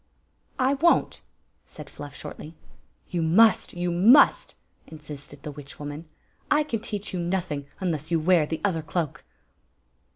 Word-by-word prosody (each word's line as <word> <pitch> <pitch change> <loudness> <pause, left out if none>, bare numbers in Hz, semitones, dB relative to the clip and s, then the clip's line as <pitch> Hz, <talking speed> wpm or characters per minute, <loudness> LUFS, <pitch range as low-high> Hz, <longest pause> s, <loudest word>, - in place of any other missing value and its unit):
" - - -42
I 265 +1 +2
won't," 335 +5 +2 0.4
said - - -12
Fluff, 145 -1 -10
shordy. 155 +3 -9 0.6
"You 175 - -1
must! 200 +8 +4
You 175 0 -2
must!" 245 - +5 0.3
insisted 150 -2 -11
the 150 - -5
witch 140 -1 -11
woman. 145 +2 -7 0.2
" - - -41
I 300 +1 +4
can 235 -7 -3
teach 210 -3 -5
you 180 - -2
nothing 170 -5 -2
unless 160 -5 -3
you 165 -1 +2
wear 165 -1 +3
the 160 - -4
other 170 -5 0
cloak." 155 -1 -3
170 Hz, 155 wpm, -25 LUFS, 150-200 Hz, 0.6 s, must